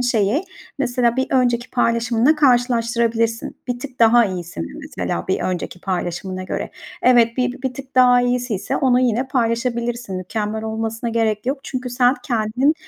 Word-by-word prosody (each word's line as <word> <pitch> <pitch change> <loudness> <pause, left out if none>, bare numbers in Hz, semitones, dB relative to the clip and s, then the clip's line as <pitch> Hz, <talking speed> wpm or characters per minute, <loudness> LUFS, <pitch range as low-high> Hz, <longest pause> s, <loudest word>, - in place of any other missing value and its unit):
şeyi, 240 - +1 0.3
mesela, 245 -3 +1
bir 260 - +1
önceki 245 -2 +1
paylaşımınla 235 +3 +2
karşılaştırabilirsin. 235 -4 +1
Bir 245 - -2
tık 255 0 -9
daha 230 +1 +6
iyisin, 175 - -4
mesela, 85 - -4
bir - - 0
önceki 180 -1 -3
paylaşımına 185 0 -3
göre. 185 - -4 0.3
Evet, 235 -2 +4
bi 250 -1 +1
bir 260 -1 -2
tık 275 -1 -10
daha 250 -1 +6
iyisiyse 245 -5 -1
onu 250 -2 +3
yine 250 +1 +1
paylaşabilirsin. 235 -3 -1
Mükemmel 210 +3 -3
olmasına 225 +1 -3
gerek 225 -1 0
yok 270 +2 0
çünkü 255 -1 -5
sen, 245 +1 +3
kendin 245 +5 +1
235 Hz, 145 wpm, -20 LUFS, 220-250 Hz, 0.3 s, daha